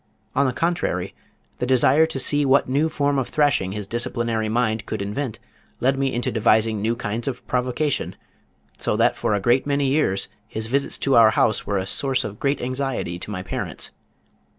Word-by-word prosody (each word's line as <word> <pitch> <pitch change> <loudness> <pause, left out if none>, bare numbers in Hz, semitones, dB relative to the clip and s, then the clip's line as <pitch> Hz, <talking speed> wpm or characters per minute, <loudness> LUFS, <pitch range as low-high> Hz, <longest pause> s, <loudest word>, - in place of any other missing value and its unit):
On 140 0 +3
the - - +1
contrary 170 +7 -1 0.5
the 125 - -1
desire 130 +5 +4
to 160 - -4
see 145 +2 +2
what 135 0 +3
new 145 +5 +1
form 145 -2 0
of 130 - -3
thrashing 140 -11 +2
his 105 -1 -4
disciplinary 115 -1 -1
mind 110 -1 0
could - - -3
invent 105 +5 -3 0.4
led 130 +2 +2
me 135 -1 +1
into 120 0 -1
devising 110 -1 +2
new 115 +2 0
kinds 115 0 -4
of 125 -2 -4
provocation, 125 +4 -1 0.6
so - - +1
that - - +3
for 105 - 0
a - - 0
great 120 +7 +2
many 140 0 +1
years 135 -9 +1 0.2
his 110 0 -4
visits 140 +5 -1
to 135 - +1
our 115 -2 +8
house 110 0 +1
were 100 - 0
a 95 - -1
source 135 +6 0
of 105 0 -7
great 140 +1 0
anxiety 130 -8 -3
to - - -6
my 95 -3 -4
parents. 90 - -5
125 Hz, 190 wpm, -23 LUFS, 110-140 Hz, 0.6 s, our